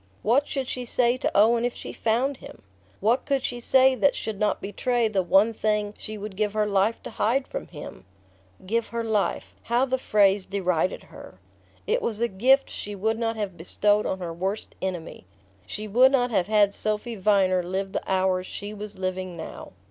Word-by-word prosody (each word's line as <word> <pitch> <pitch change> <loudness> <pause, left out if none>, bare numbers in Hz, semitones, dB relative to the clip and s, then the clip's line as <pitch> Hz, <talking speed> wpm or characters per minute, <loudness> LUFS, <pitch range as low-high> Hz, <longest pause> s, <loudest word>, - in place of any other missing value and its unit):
What 260 +7 +3
should 270 -3 -3
she 250 - -3
say 240 0 +2
to - - 0
Owen 230 +3 +5
if 245 0 -1
she - - -7
found 245 +5 0
him? - - -13 0.4
What 235 +6 +2
could 275 -2 0
she 245 - -3
say 260 +2 +5
that 280 +2 +2
should 215 -3 -5
not 210 - +1
betray 235 +3 0
the 200 -3 +1
one 195 +5 +4
thing 210 -1 0
she 215 0 -7
would 205 -1 -7
give 210 0 -1
her 215 -1 +1
life 205 +2 +1
to - - -7
hide 235 +6 0
from - - -6
him? 145 - -10 0.6
"Give 230 +4 0
her 235 0 -3
life" 215 -3 -1
how 240 +3 +1
the 260 0 -1
phrase 200 -4 +3
derided 185 -2 -1
her! - - -13 0.5
It 480 +3 +1
was 220 -2 -2
a 235 - +2
gift 255 +7 +3
she 205 0 -6
would 220 +3 -1
not 230 -1 -1
have 205 -4 -4
bestowed 205 +5 +1
on 190 - -1
her 175 -3 -5
worst 190 +5 -4
enemy. 175 - -5 0.4
She 215 +1 -5
would 250 +6 +5
not 250 -3 +2
have 185 -5 +1
had 210 -2 +4
Sophy 215 +3 -2
Viner 190 -2 +3
live 190 +2 -3
the - - -2
hours 185 -1 +1
she 205 +1 -7
was 210 -1 -8
living 185 -1 -3
now... 160 - -8
210 Hz, 195 wpm, -25 LUFS, 190-235 Hz, 0.6 s, Owen